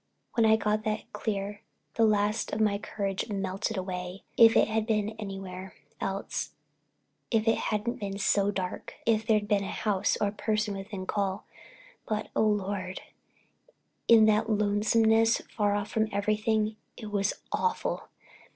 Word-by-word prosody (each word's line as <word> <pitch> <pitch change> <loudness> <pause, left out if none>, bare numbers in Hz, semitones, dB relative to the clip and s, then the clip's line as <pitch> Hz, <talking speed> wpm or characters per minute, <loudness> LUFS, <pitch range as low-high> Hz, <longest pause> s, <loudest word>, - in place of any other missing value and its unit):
When 230 -2 +4
I 220 - +6
got 215 0 0
that 215 0 -3
clear, 205 -1 -3 0.3
the 225 - +3
last 210 0 +1
of 210 - -1
my 210 -2 +2
courage 200 0 -3
melted 195 +2 -2
away. 180 0 -5
If 225 -1 +7
it - - +5
had 220 0 -1
been 210 -2 +1
anywhere 195 -2 -7 0.2
else, 195 +1 -3 0.8
if 225 -1 +1
it 225 - +3
hadn't 220 +3 -1
been 195 -1 -4
so 200 0 +2
dark, 185 -3 -4
if 220 -1 +2
there'd 215 -2 +3
been 205 -1 +2
a - - -4
house 205 -3 0
or 205 - +2
a - - -6
person 215 0 -1
within 195 -1 -6
call, 195 0 -1 0.6
but, 215 -1 -2
oh, - - +3
Lord, 195 -2 -2 1.1
in 225 -2 +8
that 215 +1 +3
lonesomeness, 220 +2 +3 0.2
far 205 -2 +2
off 205 0 -3
from 220 0 +1
everything—it 215 +1 -1
was 200 -1 +1 0.2
awful! 460 - -1
210 Hz, 150 wpm, -29 LUFS, 195-220 Hz, 1.1 s, in